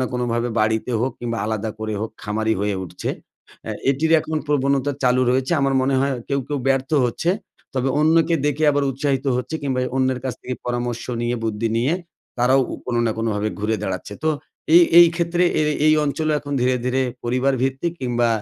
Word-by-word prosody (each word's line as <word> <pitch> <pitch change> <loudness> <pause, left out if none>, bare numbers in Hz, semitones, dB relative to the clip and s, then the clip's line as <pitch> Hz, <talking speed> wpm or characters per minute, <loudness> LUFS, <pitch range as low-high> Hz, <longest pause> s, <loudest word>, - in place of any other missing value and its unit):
না 130 - +1
কোনোভাবে 120 -1 -1
বাড়িতে 110 +2 0
হোক 130 +2 0
কিংবা 115 -1 -3
আলাদা 110 0 -2
করে 110 0 -3
হোক, 110 - -3
খামারি 110 +1 0
হয়ে 105 -1 0
উঠছে। - - -6 0.6
আ - - -2 0.2
এটির 160 +4 +1
এখন 155 0 -3
প্রবণতা 140 -1 +1
চালু 125 0 +3
রয়েছে 130 +4 +1
আমার 135 0 +1
মনে 135 +1 +1
হয় 140 0 +1 0.2
কেউ, 140 0 0
কেউ 145 -1 -1
ব্যর্থ 135 0 +1 0.2
হচ্ছে। 145 +8 -1 0.4
তবে 130 0 0
অন্যকে 165 +2 +4
দেখে 150 +2 0
আবার 145 -1 +1
উৎসাহিত 135 +1 -1
হচ্ছে 125 +5 -4
কিংবা 135 -2 -1
এ - - -2
অন্যের 130 -1 +1
কাছ 130 -4 -2
থেকে 125 - -4
পরামর্শ 120 -1 -2 0.2
নিয়ে, 120 +1 0
বুদ্ধি 110 +1 -1
নিয়ে, 125 +6 +1 0.5
তারাও 130 +3 +4
উ - - -3
কোনো 120 -1 0
না 115 - +2
কোনোভাবে 110 -2 -1
ঘুরে 110 +1 0
দাঁড়াচ্ছে। 95 +2 -4
তো - - +3 0.5
এই, 175 - +9 0.2
এই 175 - +10
ক্ষেত্রে 170 +1 +1 0.2
এ - - +3 0.2
এই 155 - +6
অঞ্চলও 155 +2 0
এখন 145 0 -7
ধীরে, 125 +1 +2
ধীরে 130 +1 +1 0.2
পরিবারভিত্তিক 130 +5 0
কিংবা 120 -2 +1
130 Hz, 190 wpm, -21 LUFS, 120-140 Hz, 0.6 s, এই